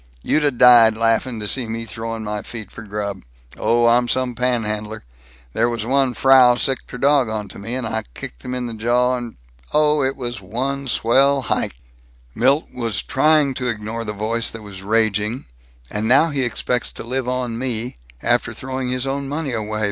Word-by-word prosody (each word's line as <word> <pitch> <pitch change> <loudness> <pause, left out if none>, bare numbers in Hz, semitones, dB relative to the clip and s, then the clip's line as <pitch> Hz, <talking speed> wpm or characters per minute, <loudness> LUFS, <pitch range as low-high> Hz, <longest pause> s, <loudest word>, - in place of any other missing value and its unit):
You'd 155 - +1
'a' 145 - +4
died 120 -3 +6
laughing 115 +1 +1
to 105 - -2
seen 120 0 -1
me 115 0 -4
throwing 115 0 -5
my 105 0 -3
feet 110 -4 -9
for - - -10
grub. 100 -2 -4 0.3
Oh, 120 0 +2
I'm 120 +1 +4
some 130 0 0
panhandler! 110 -3 -2 0.5
There 115 +2 +2
was 115 -2 -3
one 135 0 +2
Frau 130 -2 +6
sicked 130 +1 -1
her - - -7
dog 135 -2 +3
onto 105 -2 -5
me, 115 +5 -5
and 130 -2 -3
I 110 0 -2
kicked - - -8
him 125 - -4
in 125 -1 -3
the 120 - -5
jaw 120 +3 +1
and 120 -2 -6 0.4
Oh, 150 -1 +4
it 135 0 0
was 120 -4 -5
one 135 +8 -3
swell 135 +3 +3
hike." - - -1 0.6
Milt 135 - +2
was 115 -6 -2
trying 150 0 +3
to 125 -1 -3
ignore 115 0 -3
the 105 - -4
voice 110 +3 -1
that 115 -1 -9
was 100 -2 -9
raging, 110 +2 0 0.5
"And 105 +1 -2
now 140 +7 +5
he 140 -2 -1
expects 125 0 -1
to - - -6
live 125 +1 -2
on 125 -2 -2
me, 120 - -3 0.3
after - - +1
throwing 130 -1 -4
his 125 0 -1
own 135 0 -3
money 145 -1 -3
away. 110 -2 -3
120 Hz, 190 wpm, -20 LUFS, 110-130 Hz, 0.6 s, died